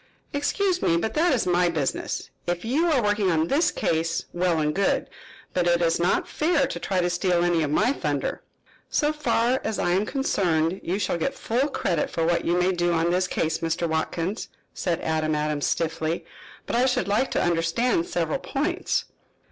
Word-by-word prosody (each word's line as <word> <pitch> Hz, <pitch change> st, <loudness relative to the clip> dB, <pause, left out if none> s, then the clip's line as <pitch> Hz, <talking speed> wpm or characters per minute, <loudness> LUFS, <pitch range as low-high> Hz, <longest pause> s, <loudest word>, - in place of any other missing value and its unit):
"Excuse 360 Hz, +6 st, 0 dB
me, 165 Hz, -, +3 dB
but 220 Hz, +6 st, -2 dB
that 335 Hz, +3 st, +3 dB
is 255 Hz, -5 st, +1 dB
my 180 Hz, 0 st, +3 dB
business. 155 Hz, -5 st, -2 dB, 0.2 s
If 175 Hz, +3 st, -2 dB
you 295 Hz, +9 st, +2 dB
are 265 Hz, -6 st, +2 dB
working 205 Hz, -2 st, +2 dB
on 160 Hz, -1 st, +1 dB
this 325 Hz, +5 st, +3 dB
case, 165 Hz, 0 st, -1 dB
well 175 Hz, -1 st, +1 dB
and 150 Hz, 0 st, +1 dB
good. 195 Hz, +3 st, +1 dB, 0.5 s
But 180 Hz, -1 st, +1 dB
it 175 Hz, 0 st, +3 dB
is 170 Hz, -1 st, +2 dB
not 175 Hz, +2 st, +1 dB
fair 310 Hz, -3 st, +1 dB
to 215 Hz, -10 st, -5 dB
try 185 Hz, +1 st, 0 dB
to 175 Hz, -, +1 dB
steal 175 Hz, 0 st, +1 dB
any 175 Hz, -2 st, +2 dB
of 150 Hz, -, 0 dB
my 245 Hz, -, +2 dB
thunder." -, -, -2 dB, 0.5 s
"So 300 Hz, 0 st, +1 dB
far 260 Hz, -4 st, +1 dB
as 220 Hz, -, -2 dB
I 175 Hz, -, 0 dB
am 195 Hz, +4 st, +1 dB
concerned 180 Hz, -, 0 dB
you 180 Hz, +3 st, -1 dB
shall 185 Hz, -4 st, -1 dB
get 275 Hz, +11 st, -1 dB
full 250 Hz, +4 st, 0 dB
credit 175 Hz, -, -1 dB
for 165 Hz, -, -1 dB
what 170 Hz, +1 st, +1 dB
you 175 Hz, +1 st, +2 dB
may 180 Hz, +1 st, +3 dB
do 175 Hz, -1 st, +1 dB
on 165 Hz, +1 st, +1 dB
this 185 Hz, +1 st, +1 dB
case, 160 Hz, -2 st, -1 dB
Mr. 165 Hz, +1 st, -1 dB
Watkins," 165 Hz, +5 st, -2 dB, 0.3 s
said 170 Hz, -3 st, -1 dB
Adam 155 Hz, -1 st, 0 dB
Adams 150 Hz, -1 st, -1 dB
stiffly. 165 Hz, 0 st, -1 dB, 0.4 s
"But -, -, -2 dB
I 250 Hz, +2 st, +4 dB
should 250 Hz, -, 0 dB
like 210 Hz, +6 st, +1 dB
to -, -, +1 dB
understand 170 Hz, +4 st, +1 dB
several 170 Hz, -, -1 dB
points." 340 Hz, +9 st, -1 dB
175 Hz, 195 wpm, -25 LUFS, 165-240 Hz, 0.5 s, I